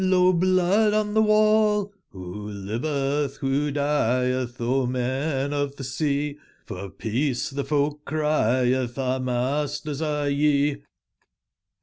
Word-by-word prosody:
lo, 185 Hz, -1 st, +4 dB
blood 185 Hz, +4 st, +3 dB
on 210 Hz, -1 st, 0 dB
tbe 220 Hz, 0 st, +3 dB
wall! 215 Hz, -1 st, +3 dB, 0.2 s
<nbo 95 Hz, +2 st, -7 dB
livetb, 135 Hz, +7 st, -2 dB
wbo 140 Hz, +2 st, 0 dB
dietb? 130 Hz, -3 st, 0 dB
O 125 Hz, +2 st, +1 dB
men 135 Hz, +3 st, -1 dB
of 145 Hz, -1 st, -2 dB
tbe 135 Hz, -, -7 dB
sea, 145 Hz, +2 st, -2 dB, 0.3 s
for 95 Hz, +1 st, -7 dB
peace 125 Hz, +7 st, -2 dB
tbe 140 Hz, 0 st, -2 dB
folk 150 Hz, 0 st, 0 dB
crietb: 130 Hz, -5 st, +1 dB
our 130 Hz, -1 st, -1 dB
masters 140 Hz, +4 st, -2 dB
are 150 Hz, -2 st, -1 dB
ye. 145 Hz, 0 st, +1 dB
140 Hz, 115 wpm, -24 LUFS, 125-155 Hz, 0.3 s, lo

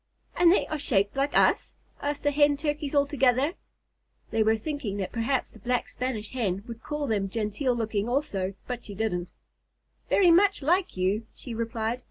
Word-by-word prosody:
"And 345 Hz, -1 st, +6 dB
they 380 Hz, -, +3 dB
are 310 Hz, -, -4 dB
shaped 205 Hz, -6 st, +1 dB
like 275 Hz, +1 st, +1 dB
us?" -, -, +3 dB, 0.3 s
asked 290 Hz, 0 st, -2 dB
the 290 Hz, -, +3 dB
Hen 290 Hz, 0 st, +4 dB
Turkeys 295 Hz, -1 st, -2 dB
all 285 Hz, 0 st, +5 dB
together. 270 Hz, +1 st, +2 dB, 0.8 s
They 225 Hz, 0 st, +1 dB
were 220 Hz, +1 st, +3 dB
thinking 255 Hz, -5 st, -4 dB
that 190 Hz, -2 st, -3 dB
perhaps 245 Hz, +3 st, -1 dB
the -, -, -16 dB
Black 245 Hz, -1 st, -1 dB
Spanish 245 Hz, -4 st, -4 dB
Hen 200 Hz, -6 st, -1 dB
would 230 Hz, -1 st, -8 dB
call 295 Hz, +1 st, -3 dB
them 205 Hz, -6 st, 0 dB
genteel 225 Hz, +5 st, -1 dB
looking 220 Hz, -1 st, -1 dB
also, 200 Hz, -8 st, -1 dB
but 245 Hz, -1 st, -5 dB
she 205 Hz, -, -8 dB
didn't. 180 Hz, -5 st, -2 dB, 0.8 s
"Very 365 Hz, -4 st, +5 dB
much 385 Hz, -2 st, +4 dB
like 355 Hz, -, +1 dB
you," 200 Hz, +5 st, 0 dB
she 245 Hz, -, -8 dB
replied. 230 Hz, +1 st, -2 dB
245 Hz, 180 wpm, -27 LUFS, 215-290 Hz, 0.8 s, And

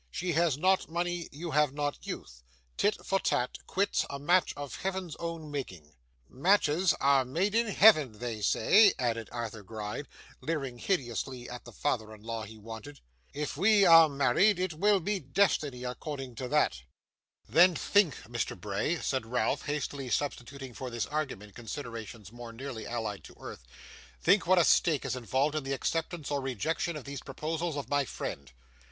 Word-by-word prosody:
She 180 Hz, -, -2 dB
has 160 Hz, -3 st, +2 dB
not 185 Hz, +3 st, +2 dB
money, 175 Hz, 0 st, -2 dB
you 160 Hz, +4 st, -6 dB
have 150 Hz, -2 st, +3 dB
not 145 Hz, -1 st, -3 dB
youth. -, -, -7 dB, 0.3 s
Tit 205 Hz, +1 st, 0 dB
for 195 Hz, -, +1 dB
tat, 125 Hz, -8 st, -1 dB
quits, 200 Hz, +2 st, +1 dB
a 140 Hz, -, -4 dB
match 175 Hz, +6 st, +3 dB
of 145 Hz, -2 st, -6 dB
Heaven's 190 Hz, -4 st, -3 dB
own 165 Hz, -3 st, -5 dB
making!' 90 Hz, -, -6 dB, 0.3 s
'Matches 170 Hz, +2 st, +3 dB
are 140 Hz, -1 st, +4 dB
made 170 Hz, +11 st, -1 dB
in 230 Hz, +1 st, +2 dB
Heaven, 195 Hz, -, +6 dB
they 115 Hz, -2 st, -4 dB
say,' 200 Hz, -, +5 dB
added 115 Hz, -3 st, -1 dB
Arthur 115 Hz, -3 st, -5 dB
Gride, 105 Hz, +6 st, -6 dB, 0.3 s
leering 135 Hz, -7 st, -3 dB
hideously 125 Hz, -, -2 dB
at 125 Hz, 0 st, -8 dB
the -, -, -10 dB
father 110 Hz, -6 st, -2 dB
in 105 Hz, -, -18 dB
law 115 Hz, -1 st, -4 dB
he 110 Hz, +2 st, -12 dB
wanted. 115 Hz, +7 st, -9 dB, 0.3 s
'If 150 Hz, 0 st, -4 dB
we 200 Hz, +5 st, +5 dB
are 165 Hz, -2 st, +8 dB
married, 140 Hz, -, +3 dB
it 180 Hz, -2 st, -1 dB
will 200 Hz, +5 st, +3 dB
be 200 Hz, +3 st, -1 dB
destiny, 145 Hz, -4 st, +1 dB
according 135 Hz, +1 st, -5 dB
to 130 Hz, -, -4 dB
that.' 145 Hz, -, +1 dB, 0.7 s
'Then 175 Hz, +1 st, +6 dB
think, 200 Hz, -6 st, +3 dB
Mr. 120 Hz, -3 st, -4 dB
Bray,' 105 Hz, -, -1 dB
said 130 Hz, -4 st, -1 dB
Ralph, 125 Hz, +2 st, 0 dB
hastily 140 Hz, -2 st, -3 dB
substituting 135 Hz, 0 st, -3 dB
for 130 Hz, +2 st, -6 dB
this 120 Hz, -1 st, -2 dB
argument 130 Hz, -10 st, -4 dB
considerations 115 Hz, -4 st, -7 dB
more 120 Hz, 0 st, -9 dB
nearly 115 Hz, -1 st, -7 dB
allied 110 Hz, -4 st, -4 dB
to -, -, -13 dB
earth, -, -, -9 dB, 0.5 s
'think 180 Hz, 0 st, +3 dB
what 185 Hz, +1 st, +5 dB
a 175 Hz, -, +6 dB
stake 155 Hz, -5 st, +3 dB
is -, -, -1 dB
involved 130 Hz, +4 st, 0 dB
in 155 Hz, -2 st, -2 dB
the 135 Hz, 0 st, -2 dB
acceptance 160 Hz, +1 st, -2 dB
or 140 Hz, -1 st, 0 dB
rejection 145 Hz, -, -2 dB
of 150 Hz, -, -6 dB
these 140 Hz, -1 st, -6 dB
proposals 160 Hz, +3 st, -3 dB
of 140 Hz, -5 st, -4 dB
my 145 Hz, +1 st, +2 dB
friend. 70 Hz, -, -6 dB
140 Hz, 170 wpm, -30 LUFS, 120-170 Hz, 0.7 s, are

